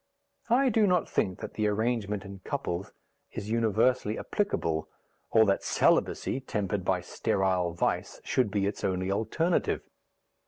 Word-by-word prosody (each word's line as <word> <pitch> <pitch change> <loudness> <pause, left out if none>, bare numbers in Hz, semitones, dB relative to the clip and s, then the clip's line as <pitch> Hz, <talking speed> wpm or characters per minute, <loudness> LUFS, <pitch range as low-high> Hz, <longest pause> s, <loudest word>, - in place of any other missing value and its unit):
I 260 +3 +4
do 220 -2 +3
not 180 -2 +2
think 95 -2 -1
that - - -6
the 105 -1 0
arrangement 105 -2 -1
in 100 0 -9
couples 90 0 -4 0.4
is 105 +2 -5
universally 115 0 +2
applicable, 85 - -1 0.4
or 110 0 +5
that 100 -1 +2
celibacy - - +2
(tempered 105 -6 -2
by - - +1
sterile 90 -3 0
vice) 85 - -1
should 125 -5 +1
be 100 -1 0
its 100 - -3
only 95 0 0
alternative. 160 - 0
105 Hz, 135 wpm, -29 LUFS, 95-125 Hz, 0.4 s, or